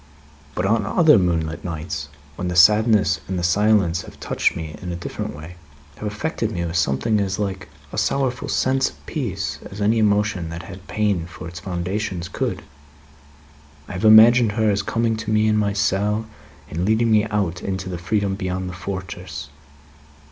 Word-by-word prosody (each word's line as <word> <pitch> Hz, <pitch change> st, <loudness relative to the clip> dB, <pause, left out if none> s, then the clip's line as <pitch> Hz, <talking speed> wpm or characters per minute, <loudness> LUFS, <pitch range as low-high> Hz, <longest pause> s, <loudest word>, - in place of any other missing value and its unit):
But 90 Hz, -, -1 dB
on 110 Hz, +2 st, +2 dB
other 150 Hz, -, +5 dB
moonlight 85 Hz, -3 st, -1 dB
nights, 80 Hz, -3 st, -5 dB, 0.3 s
when 90 Hz, -, -4 dB
the 90 Hz, -, -2 dB
sadness 105 Hz, 0 st, +5 dB
and 95 Hz, -, -2 dB
the 90 Hz, -, -2 dB
silence 95 Hz, -2 st, +3 dB
have -, -, -13 dB
touched -, -, 0 dB
me 80 Hz, -2 st, -6 dB
in 90 Hz, -1 st, -5 dB
a -, -, -3 dB
different 85 Hz, -3 st, -5 dB
way 80 Hz, +4 st, -10 dB, 0.4 s
have 105 Hz, -, -4 dB
affected 110 Hz, +1 st, -2 dB
me 85 Hz, -4 st, -2 dB
with 85 Hz, 0 st, -4 dB
something 90 Hz, -, +1 dB
as 100 Hz, -1 st, -1 dB
like 95 Hz, -2 st, -3 dB, 0.2 s
a -, -, -1 dB
sorrowful 130 Hz, -2 st, 0 dB
sense 135 Hz, 0 st, +2 dB
of -, -, -20 dB
peace, -, -, -3 dB
as 95 Hz, -, -9 dB
any 110 Hz, +2 st, +2 dB
emotion 105 Hz, -5 st, +1 dB
that 85 Hz, +2 st, -6 dB
had 95 Hz, -1 st, -11 dB
pain 100 Hz, -6 st, 0 dB
for 85 Hz, -1 st, -9 dB
its 85 Hz, +2 st, -8 dB
foundations 90 Hz, 0 st, -3 dB
could -, -, -3 dB, 1.2 s
I -, -, -9 dB
have 90 Hz, -, -5 dB
imagined 110 Hz, +1 st, +7 dB
her 110 Hz, -1 st, +2 dB
as 100 Hz, 0 st, 0 dB
coming 115 Hz, +2 st, 0 dB
to 110 Hz, 0 st, -5 dB
me 110 Hz, 0 st, +3 dB
in 110 Hz, -, +3 dB
my 105 Hz, -1 st, +1 dB
cell, 105 Hz, +1 st, 0 dB, 0.4 s
and 85 Hz, +3 st, -3 dB
leading 110 Hz, +3 st, +2 dB
me 105 Hz, 0 st, +4 dB
out 100 Hz, -5 st, -1 dB
into 95 Hz, -1 st, -3 dB
the 90 Hz, -2 st, -5 dB
freedom 100 Hz, +2 st, 0 dB
beyond 95 Hz, -1 st, -3 dB
the -, -, -7 dB
fortress. 90 Hz, -4 st, -6 dB
100 Hz, 180 wpm, -22 LUFS, 90-110 Hz, 1.2 s, imagined